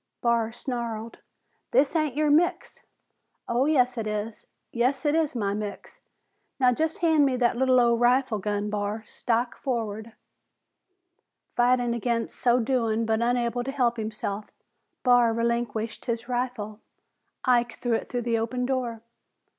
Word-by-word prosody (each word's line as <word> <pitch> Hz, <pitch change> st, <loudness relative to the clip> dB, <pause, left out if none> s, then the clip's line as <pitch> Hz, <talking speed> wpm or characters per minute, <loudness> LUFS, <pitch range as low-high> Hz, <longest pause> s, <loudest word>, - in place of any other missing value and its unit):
Barr 235 Hz, -2 st, +1 dB
snarled, 235 Hz, -2 st, -5 dB, 0.5 s
"This 285 Hz, +4 st, +2 dB
ain't 305 Hz, -5 st, +1 dB
your 300 Hz, 0 st, +2 dB
mix!" 335 Hz, +4 st, +1 dB, 0.7 s
"Oh, 245 Hz, +3 st, +2 dB
yes, 250 Hz, -5 st, +2 dB
it 215 Hz, -, -3 dB
is! 210 Hz, +1 st, -4 dB, 0.2 s
Yes, 250 Hz, +5 st, 0 dB
it 295 Hz, -, +3 dB
is 320 Hz, -4 st, +1 dB
my 200 Hz, -4 st, 0 dB
mix! 205 Hz, -1 st, -6 dB, 0.6 s
Now 250 Hz, -1 st, +5 dB
just 315 Hz, +5 st, -1 dB
hand 315 Hz, -3 st, +5 dB
me 270 Hz, -2 st, +2 dB
that 245 Hz, -1 st, +2 dB
lil' 255 Hz, 0 st, +4 dB
old 235 Hz, -1 st, +3 dB
rifle 245 Hz, -2 st, +3 dB
gun, 205 Hz, +1 st, -2 dB
Barr. 210 Hz, +1 st, -2 dB
Stock 240 Hz, +2 st, -1 dB
foremost." 225 Hz, -3 st, -3 dB, 1.4 s
Fighting 245 Hz, 0 st, +3 dB
against 235 Hz, 0 st, -2 dB
so 245 Hz, 0 st, +3 dB
doing 230 Hz, -2 st, 0 dB
but 220 Hz, 0 st, +1 dB
unable 245 Hz, 0 st, 0 dB
to 265 Hz, -, -5 dB
help 245 Hz, -4 st, +1 dB
himself, 215 Hz, -1 st, -4 dB, 0.6 s
Barr 245 Hz, -3 st, +4 dB
relinquished 230 Hz, -1 st, -2 dB
his 235 Hz, -1 st, -3 dB
rifle. 245 Hz, -4 st, -3 dB, 0.7 s
Ike 240 Hz, -2 st, +2 dB
threw 245 Hz, -2 st, 0 dB
it 225 Hz, -, -1 dB
through 245 Hz, -1 st, -2 dB
the 230 Hz, -1 st, +1 dB
open 250 Hz, +2 st, -2 dB
door. 245 Hz, -4 st, -2 dB
240 Hz, 145 wpm, -26 LUFS, 225-255 Hz, 1.4 s, Now